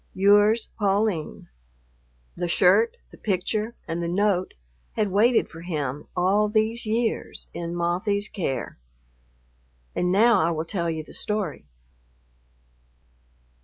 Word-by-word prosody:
Yours, 205 +3 +4
Pauline." 200 -5 0 0.9
The 175 - -2
shirt, 450 - +4
the - - -15
picture, 215 +3 -1
and 165 +1 -3
the 170 - -2
note 185 +1 0 0.4
had 210 -3 0
waited 225 +5 +3
for 165 - -11
him 150 -5 -4
all 195 +4 +2
these 220 +2 0
years 225 +1 -2
in 170 0 -4
Mothie's 185 +4 0
care. 140 - -4 1.1
And 180 0 0
now 220 +2 +5
I 160 - +2
will 160 -1 -2
tell 170 -1 -2
you 160 -1 -3
the - - -15
story. 195 - -3
195 Hz, 120 wpm, -25 LUFS, 170-215 Hz, 1.1 s, now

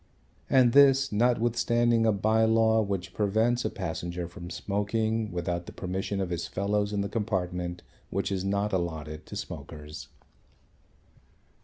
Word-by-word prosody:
And 125 -3 +5
this, 135 -1 +6
notwithstanding 120 0 +2
a - - +5
bye 110 +2 +2
law 110 0 +4
which 95 -3 -3
prevents 110 +4 +1
a 110 - 0
passenger 85 -2 -4
from 85 0 -9
smoking 105 +4 -1
without 85 0 -3
the - - -7
permission 95 +2 -3
of 95 -2 -2
his 85 -1 -2
fellows 100 +1 -1
in 100 -1 0
the 100 - -1
compartment 90 -5 -2 0.3
which 100 +2 -2
is 95 -1 -1
not 100 +1 0
allotted 80 -4 -3
to - - -8
smokers. 75 +1 -7
100 Hz, 140 wpm, -28 LUFS, 90-110 Hz, 0.3 s, this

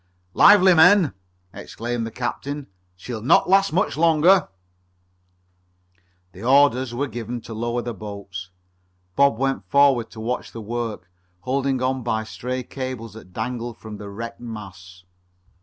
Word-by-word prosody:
"Lively, 190 -2 +7
men!" 175 - +6 0.4
exclaimed 120 0 -4
the - - -8
captain. 140 +4 -4 0.3
"She'll 110 +5 -7
not 120 - +4
last 195 +1 +4
much 185 +6 0
longer!" 165 +4 +4 1.8
The 95 - -13
orders 130 0 +3
were 140 +4 -1
given 120 -1 -5
to 115 - -9
lower 120 +2 -2
the 120 0 -4
boats. 100 -3 -8 0.7
Bob 140 -4 +4
went 135 +1 -1
forward 140 -5 +4
to 110 - -12
watch 120 +3 -4
the 115 - -7
work, 110 -4 -4 0.3
holding 130 0 -1
on 130 0 0
by 110 -2 -1
stray 125 +3 -5
cables 130 -5 -6
that 110 -4 -13
dangled 120 +3 -4
from 110 -1 -9
the 100 0 -8
wrecked 115 +3 -7
masts. 95 -5 -10
120 Hz, 140 wpm, -22 LUFS, 110-140 Hz, 1.8 s, Lively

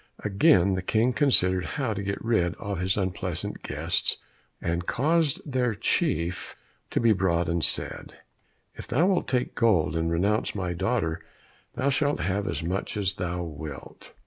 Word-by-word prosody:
Again 95 -2 +4
the 95 - -1
King 115 +6 +1
considered 95 -11 +3
how 130 -6 0
to 100 - -4
get 100 +2 -4
rid 90 -7 +1
of 100 -3 -4
his 95 +2 0
unpleasant 95 -2 -3
guests, - - 0 0.4
and 85 +1 -2
caused 155 +2 +2
their 125 -5 0
chief 85 -2 -1 0.3
to - - 0
be 115 -2 +4
brought 90 -3 +1
and 85 -1 0
said, - - -1 0.6
"If - - -10
thou 150 +9 +2
wilt 190 -2 +1
take 125 -1 0
gold 90 -10 +2
and 80 0 0
renounce 100 +7 +1
my 90 -3 -2
daughter, 90 -3 -1 0.5
thou 135 +3 +1
shalt 145 -6 +1
have 100 +4 -1
as - - -2
much 95 +5 -3
as 100 -2 0
thou 90 -2 -3
wilt." 75 -3 -9
95 Hz, 160 wpm, -26 LUFS, 85-115 Hz, 0.6 s, Again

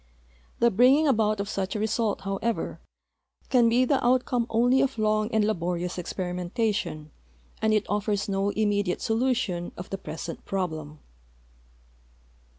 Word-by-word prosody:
The 235 0 +3
bringing 260 +9 +5
about 215 -5 +2
of 200 - -2
such 195 -1 -3
a - - -1
result, 220 0 0
how 195 0 -3
ever, 230 +2 -2 0.7
can 240 -3 +5
be 245 +2 +3
the 270 +1 +1
outcome 245 -1 +2
only 245 +3 +3
of 270 -2 0
long 215 0 +1
and 220 -2 +2
laborious 180 -3 -2
experimen 180 0 -4
tation 205 -10 -1 0.5
and 220 0 +2
it 215 -1 +2
offers 205 0 -1
no 195 0 0
immediate 205 -3 0
solution 225 -7 0
of 180 - -8
the 195 - -3
present 165 -2 -7
})roblem. 155 -6 -3
210 Hz, 145 wpm, -26 LUFS, 190-235 Hz, 0.7 s, bringing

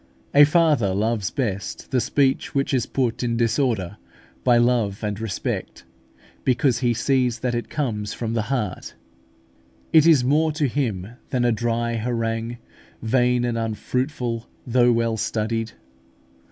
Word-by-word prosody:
A 145 +1 +8
father 145 - +2
loves 110 0 0
best 105 -7 -4
the 130 -2 +2
speech 135 +4 0
which 135 0 0
is 125 -3 +1
put 125 -4 -1
in 120 -2 -1
disorder 115 -5 0 0.5
by 120 -2 +5
love 120 -4 +1
and 105 -1 -2
respect, 110 -3 -4 0.6
because 125 -1 +2
he 120 -2 +2
sees 125 0 +1
that 125 -2 -1
it 120 0 -3
comes 105 -8 -2
from 115 0 -4
the 115 - +1
heart: 110 -9 -3 1.0
it 160 0 +7
is 150 -7 +6
more 155 +5 +2
to 150 -2 0
him 115 -9 -2 0.2
than 125 -1 0
a 120 - +3
dry 115 +1 -1
harangue, 115 0 -2 0.5
vain 125 +1 +2
and 120 -1 -1
unfruitful 120 +2 -3 0.2
though 120 0 +4
well 115 -1 +1
studied. 110 +1 -2
120 Hz, 140 wpm, -23 LUFS, 115-130 Hz, 1.0 s, A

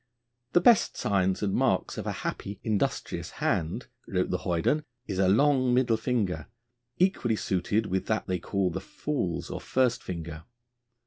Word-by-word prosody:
'The 175 - +5
best 230 +3 +5
signs 95 -1 +1
and 100 -2 0
marks - - +1
of - - -5
a - - 0
happy, 100 0 -4
industrious 110 -3 -1
hand,' 80 0 0 0.2
wrote - - 0
the - - 0
hoyden, 90 - +1 0.2
'is 95 -2 -3
a 95 - +4
long 130 +3 +4
middle 125 -3 +3
finger, 105 - -1 0.5
equally 175 -11 +2
suited 100 +3 0
with 95 -1 -2
that 110 0 0
they 90 -1 -1
call 95 +1 0
the - - -4
fool's 145 - -3
or - - -4
first 125 -2 +1
finger.' 80 -3 -6
105 Hz, 155 wpm, -28 LUFS, 90-125 Hz, 0.5 s, The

